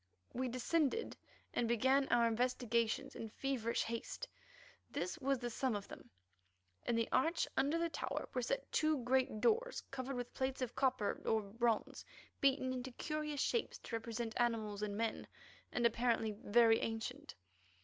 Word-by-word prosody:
We 255 +1 -1
descended 290 - 0 0.4
and 235 - +1
began 260 +4 +3
our 235 - +4
investigations 235 -1 +1
in 225 - -5
feverish 235 -1 -1
haste. 235 - -4 0.6
This 350 - -3
was 275 -1 +1
the 240 -1 -4
sum 255 0 0
of 200 -1 -4
them: - - -11 0.8
In 240 - +2
the 230 0 +2
arch 325 +5 +2
under 280 +5 +2
the 335 0 +1
tower 330 - -3
were - - 0
set - - -2
two 310 -4 +2
great 255 -3 +2
doors 480 - +2
covered 270 0 -3
with 245 -1 -4
plates 260 0 -1
of 245 -1 -3
copper 255 -5 +1
or 220 -1 +2
bronze 225 +2 0 0.4
beaten 265 -1 +3
into 255 0 -4
curious 305 0 -2
shapes 470 - 0
to 230 - -5
represent 230 0 -3
animals 220 -4 0
and 205 -1 -2
men, 225 0 -1 0.4
and 240 - +1
apparently 230 -1 +2
very 225 +2 +4
ancient. 225 0 -4
245 Hz, 155 wpm, -37 LUFS, 230-270 Hz, 0.8 s, our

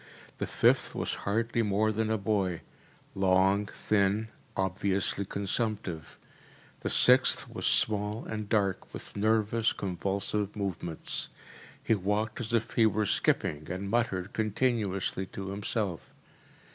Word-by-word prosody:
The - - -2
fifth - - +2
was - - -2 0.2
hardly 115 +3 +1
more 110 0 +1
than 110 +1 -1
a 110 - +1
boy, 100 -4 -1 0.5
long, 95 +2 +3
thin, 105 +1 0 0.3
obviously 95 +1 0
consumptive. 100 -4 -3 0.6
The - - -3
sixth - - +6
was - - -3
small 105 +1 +1
and 110 -1 -5
dark, 100 -4 0
with - - -8
nervous, 110 +1 +2
convulsive 100 +2 -2
movements. 90 -5 -2 0.5
He - - +2
walked 105 +2 -1
as 115 0 -4
if 115 -1 0
he 115 -2 +4
were 110 0 0
skipping, 75 -5 0
and 95 +3 -4
muttered 110 -5 0
continuously 105 -4 -1
to 95 +1 -7
himself. 100 -3 -2
100 Hz, 120 wpm, -29 LUFS, 95-110 Hz, 0.6 s, sixth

